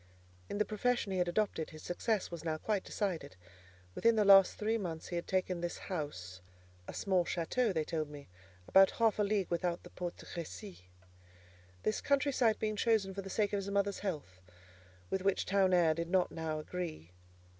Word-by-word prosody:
In - - -3
the 210 - +2
profession 220 0 0
he 185 - 0
had 180 - +2
adopted, 175 -3 0
his 155 - -12
success 205 +3 -1
was 170 -1 -6
now 160 -1 -1
quite 205 +3 -1
decided. 185 - -3 0.6
Within 230 - +3
the 210 -1 +3
last 195 -1 +7
three 220 +1 0
months 165 -5 -5
he 175 - -3
had 170 - -3
taken 185 -2 0
this 175 0 -3
house 95 - -5 0.5
(a - - -6
small 190 -3 +2
château, 200 +8 0
they 160 -4 0
told 155 -1 -3
me, 145 -1 -10 0.4
about 195 0 +7
half 225 -2 +1
a - - +4
league 200 -3 0
without 170 0 -1
the - - -12
Porte 175 -1 -5
de - - -12
Crécy); 175 - -8 1.0
this 215 - 0
country 280 0 +2
site 235 -5 +3
being 215 -1 -2
chosen 210 -4 +2
for 195 - -4
the 195 - -8
sake 205 +1 0
of - - +2
his 195 0 -5
mother's 200 0 0
health, 145 - -5 0.7
with 190 - 0
which 195 0 +1
town 195 -1 +3
air 170 -3 +4
did 170 +1 -4
not 185 -1 +2
now 160 -1 -3
agree. 155 - -5
185 Hz, 195 wpm, -33 LUFS, 165-210 Hz, 1.0 s, last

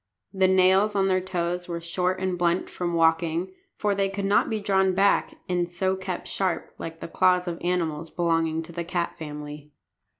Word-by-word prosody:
The 190 -1 +3
nails 190 +3 +4
on 195 -1 +2
their 185 0 +2
toes 180 -1 -2
were 170 -1 -3
short 180 +2 -1
and 185 -1 -1
blunt 175 +1 0
from 175 -1 -2
walking, 165 +2 +2 0.3
for 210 -1 +1
they 195 0 +1
could 195 0 -3
not 200 +1 +3
be 220 - -1
drawn 190 -2 +2
back 200 +1 +2
and 175 -1 0
so 185 +2 0
kept 185 -1 -5
sharp, 185 -4 -2
like 165 0 -7
the - - -5
claws 180 +1 +2
of 170 -1 -4
animals 165 -3 -1
belonging 165 -1 0
to 165 - -11
the 170 0 -4
cat 170 0 -2
family. 150 -1 -7
180 Hz, 190 wpm, -25 LUFS, 170-190 Hz, 0.3 s, nails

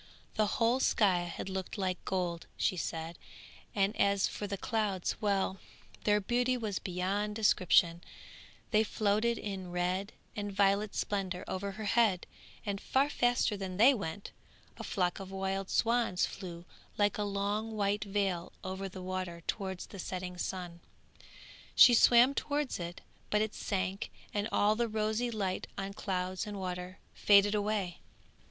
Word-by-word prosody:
The 215 -1 +2
whole 235 +2 +3
sky 185 -8 +3
had 175 - -6
looked 190 +2 -4
like 185 -2 -2
gold, 175 -3 -2
she - - +1
said, 165 -1 -4 0.6
and 200 +1 +2
as 200 -1 +3
for 205 - -5
the 200 0 -3
clouds! 205 -4 -1
well, 195 -2 +1 0.5
their 210 0 +4
beauty 245 +5 +1
was 215 -5 -2
beyond 195 +3 -2
description; 180 -5 +3 0.7
they 215 -1 +5
floated 215 +2 +1
in 190 -3 -5
red 180 +3 -1 0.2
and 205 -1 -3
violet 200 +1 +2
splendour 190 -3 -2
over 195 +1 -3
her 215 +2 -6
head, 205 -3 +3 0.4
and, 200 -1 -2
far 275 +2 +2
faster 245 -4 +2
than 190 -2 -5
they 245 +7 +7
went, 200 -4 -5 0.5
a - - -6
flock 180 0 0
of 190 -1 -7
wild 195 0 -2
swans 230 -6 +2
flew 175 -3 -8 0.3
like 205 0 +2
a - - +1
long 205 +2 -2
white 205 0 +1
veil 195 -4 -1
over 190 +1 -4
the 185 0 -8
water 185 -2 -4
towards 190 -3 -3
the 200 - -11
setting 180 0 -4
sun; 180 -1 -4 1.0
she 245 - +9
swam 240 +3 +7
towards 290 -4 -1
it, 170 0 -6 0.3
but 210 - +3
it 215 - -3
sank 195 0 -2 0.2
and 205 +1 -1
all 210 +1 +3
the 235 +1 +1
rosy 220 +2 0
light 200 -5 -2
on 195 0 -4
clouds 185 -1 -2
and 205 -1 -5
water 180 0 -5 0.2
faded 205 0 +5
away. 205 -4 -1
200 Hz, 150 wpm, -32 LUFS, 185-215 Hz, 1.0 s, she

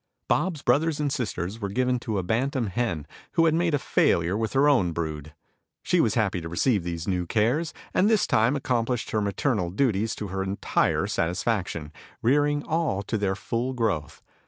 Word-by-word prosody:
Bob's 170 -7 0
brothers 155 +1 +2
and 145 -2 0
sisters 105 -3 -3
were 100 - -2
given 125 +4 +1
to 110 -3 -3
a 95 - -1
bantam 125 - 0
hen, 90 -9 -1 0.3
who 165 -1 +4
had 160 - +4
made 165 -1 +2
a - - +2
failure 85 -8 +2
with 110 0 -2
her 135 +2 +4
own 100 - +3
brood. 75 -2 -5 0.5
She - - +3
was - - +1
happy 90 - +1
to 80 - -6
receive 100 +3 +1
these 85 -1 -4
new 90 -3 -1
cares, 125 - +1 0.2
and 200 - +3
this 220 -3 +3
time 115 +5 +2
accomplished 125 -3 -1
her 110 - +1
maternal 100 -1 0
duties 110 +1 0
to 105 - -5
her 95 +1 -3
entire 95 +1 0
satisfaction, 90 -3 -1 0.3
rearing 145 +3 +2
all 155 - -1
to 110 - -3
their 100 -3 0
full 120 +5 -2
growth. 105 - -2
110 Hz, 180 wpm, -26 LUFS, 95-135 Hz, 0.5 s, who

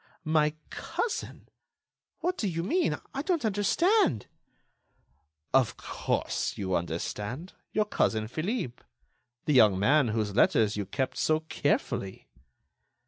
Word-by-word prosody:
"My 155 -1 +2 0.2
cousin! 465 - -4 0.7
What 360 +1 0
do 215 - -1
you 165 -2 -2
mean? 335 - +1 0.2
I 275 - -2
don't 330 -4 0
understand." 210 - +2 1.3
"Of 130 -4 +3
course, - - -2
you 95 -2 -1
understand. 105 - -4 0.2
Your 215 0 +1
cousin 110 - 0
Philippe. 155 - -3 0.6
The 150 - +2
young 110 -7 +6
man 135 +7 +4
whose 110 -2 -1
letters 110 -3 +4
you 100 -2 -3
kept 130 +4 -2
so 155 0 +2
carefully." 95 - -2
150 Hz, 115 wpm, -29 LUFS, -, 1.3 s, young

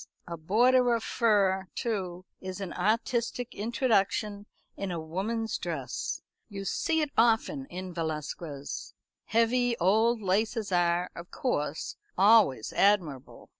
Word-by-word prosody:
A 170 - -5
border 240 +9 +3
of 230 - -3
fur, 195 -5 +2
too, 185 -6 -3
is 185 +1 -6
an 190 -3 -5
artistic 235 +4 -1
introduction 210 -2 0 0.3
in 195 - -4
a 175 -2 -3
woman's 205 +8 -3
dress - - -4 0.3
you 195 -2 -6
see 320 - 0
it 300 -2 -1
often 235 +5 +2
in 185 -3 -7
Velasquez. 155 -3 -5 0.3
Heavy 235 +1 +2
old 220 +6 +3
laces 210 +2 0
are, 175 0 +2
of 170 +1 -9
course, 150 - -2 0.2
always 195 - +5
admirable. 175 -10 +1
200 Hz, 120 wpm, -29 LUFS, 180-230 Hz, 0.3 s, always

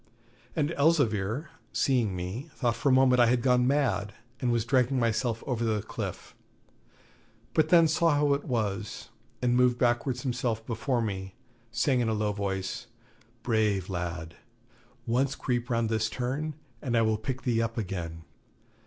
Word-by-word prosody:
And 155 0 +1
Elzevir, 140 - +2 0.2
seeing 120 -8 +1
me, 95 - -5
thought 120 -3 0
for 115 +5 +1
a - - +5
moment 130 -1 +5
I 120 - +6
had 120 0 +2
gone 125 -1 +4
mad, 110 -8 +1 0.2
and 125 - +1
was 115 -2 +1
dragging 130 +1 +2
myself 115 0 0
over 120 -3 -1
the 110 -2 0
cliff; - - -6 1.2
but 155 -1 +3
then 170 -1 +7
saw 165 +2 +3
how 145 -1 +3
it 140 - -1
was, 110 -6 -3 0.3
and 125 0 +3
moved 125 -1 +4
backwards 125 +1 +1
himself 120 -4 -1
before 120 +1 -1
me, 95 -3 -4 0.4
saying 125 +2 +2
in 120 -2 +1
a - - +1
low 105 0 0
voice, 100 +2 -3 0.6
'Brave 105 -6 +1
lad! 85 -2 -4 0.7
Once 130 +4 +1
creep 120 -1 -2
round 115 -1 +1
this 110 0 0
turn, 135 +6 -3 0.3
and 120 -4 0
I 115 - +4
will 110 -1 +1
pick 125 +4 -4
thee 115 -3 +1
up 115 0 -2
again. 85 -6 -4
120 Hz, 160 wpm, -28 LUFS, 110-130 Hz, 1.2 s, then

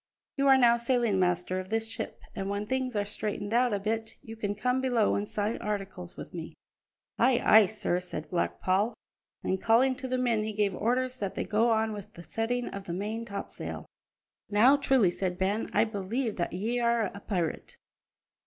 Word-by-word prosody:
"You 275 -1 +2
are 270 -1 +7
now 235 -2 +5
sailing 235 -4 +1
master 180 0 +1
of 185 0 -7
this 225 0 0
ship; 225 - -6
and 195 0 -4
when 200 +1 -2
things 260 0 -2
are 205 -1 +1
straightened 205 0 -4
out 245 +1 +3
a 205 - +1
bit 220 +2 -2
you 225 - -8
can 205 -2 -2
come 250 +5 0
below 245 -5 +2
and 205 - -1
sign 210 +2 -1
articles 195 -4 -5
with - - -9
me." 165 -2 -7 0.6
"Ay, 245 0 +4
ay, 215 -2 +8
sir," 210 -4 -1
said 175 -4 -6
Black 175 - -1
Paul, 200 +5 +1 0.5
and 190 0 -1
calling 245 +4 +4
to 260 - -5
the 255 0 0
men 235 -4 +1
he 215 0 -3
gave 205 -2 +1
orders 255 +5 0
that 200 -2 -3
they - - -1
go 220 +3 +2
on 220 -1 +1
with 210 +1 -9
the 170 - -10
setting 225 +8 -2
of 195 -1 -7
the 170 - -4
main 215 +5 -3
topsail. 200 -3 -6 0.6
"Now, 230 +7 +6
truly," 265 -9 +3
said 180 0 -2
Ben, 195 +4 0
"I - - +4
believe 220 +2 -2
that 175 - -1
ye're 235 +2 +1
a 200 - -8
pirate." 180 -6 -3
215 Hz, 195 wpm, -29 LUFS, 195-235 Hz, 0.6 s, ay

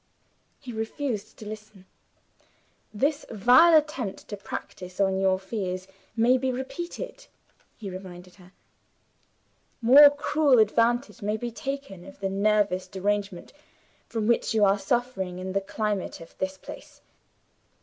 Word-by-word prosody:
He 255 -4 -9
refused 220 -1 -4
to 215 - -10
listen. 215 -3 -10 1.1
"This 280 +8 0
vile 250 - +6
attempt 275 -10 -2
to 205 - -4
practice 185 -2 -8
on 190 -1 +2
your 190 -1 +3
fears 190 -2 -4 0.3
may 240 +3 +4
be 260 0 0
repeated," 345 - -6 0.5
he 210 - -8
reminded 185 -1 -9
her. 180 -1 -17 1.3
"More 275 +5 +9
cruel 290 -1 +2
advantage 235 +4 +2
may 210 +1 -1
be 240 +2 -4
taken 275 -7 -6
of 195 +1 -13
the 195 - -2
nervous 200 -2 +1
derangement 200 -1 -3 0.5
from 225 -2 -2
which 230 0 +1
you 210 -2 +5
are 200 +1 +3
suffering 195 -4 -1
in 185 +1 -5
the 195 - +1
climate 210 0 -3
of 165 - -13
this 190 0 -2
place. - - -12
215 Hz, 130 wpm, -26 LUFS, 190-250 Hz, 1.3 s, More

